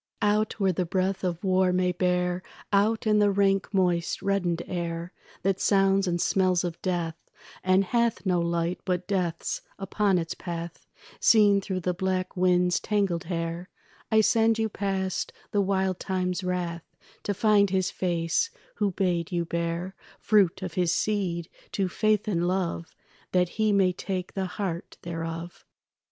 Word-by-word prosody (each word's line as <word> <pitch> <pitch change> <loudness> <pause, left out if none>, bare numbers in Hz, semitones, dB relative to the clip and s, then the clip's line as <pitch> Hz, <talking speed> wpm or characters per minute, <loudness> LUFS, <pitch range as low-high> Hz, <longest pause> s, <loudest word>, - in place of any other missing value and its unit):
Out 210 +1 +1
where 190 -2 +2
the 180 - 0
breath 185 +2 -1
of 175 0 -2
war 185 -1 +3
may 180 0 +2
bear, 180 0 0 0.3
Out 215 +3 +2
in 210 -1 +4
the 205 0 +4
rank 195 -1 +2
moist 180 -4 +1
reddened 180 -4 0
air 170 -1 -4 0.3
That 195 0 +1
sounds 195 -1 +3
and 175 -1 0
smells 185 -1 +2
of 170 -2 -4
death, 175 -3 -1 0.5
and 185 +1 +4
hath 235 +2 0
No 180 -2 +2
light 170 +1 -1
but 180 -1 -2
death's 180 -4 -1 0.2
upon 195 -1 +1
its 165 -1 -2
path 170 -1 -7 0.3
Seen 205 -3 +5
through 185 -1 -3
the 180 +1 0
black 185 0 -2
wind's 180 -1 +3
tangled 195 -5 0
hair, 170 +1 -3 0.4
I 220 0 +6
send 225 +1 +3
you 220 0 0
past 195 -2 -2 0.2
the 205 - +2
wild 190 -1 0
time's 185 0 -2
wrath 175 -2 -3 0.3
To 205 - -2
find 205 -1 +4
his 185 -1 0
face 170 - 0 0.3
who 205 -1 +2
bade 175 -3 0
you 170 -1 0
bear 170 +2 -2 0.2
Fruit 200 -4 +2
of 180 -3 -4
his 175 -1 +1
seed 175 -4 -1 0.3
to 195 -2 +1
faith 215 +3 +1
and 175 -4 +1
love, 180 -3 -2 0.4
That 180 -1 +3
he 215 +2 +1
may 190 -2 +3
take 185 0 -4
the 190 -1 -2
heart 180 -2 -4
thereof. 165 0 -5
185 Hz, 155 wpm, -27 LUFS, 175-195 Hz, 0.5 s, I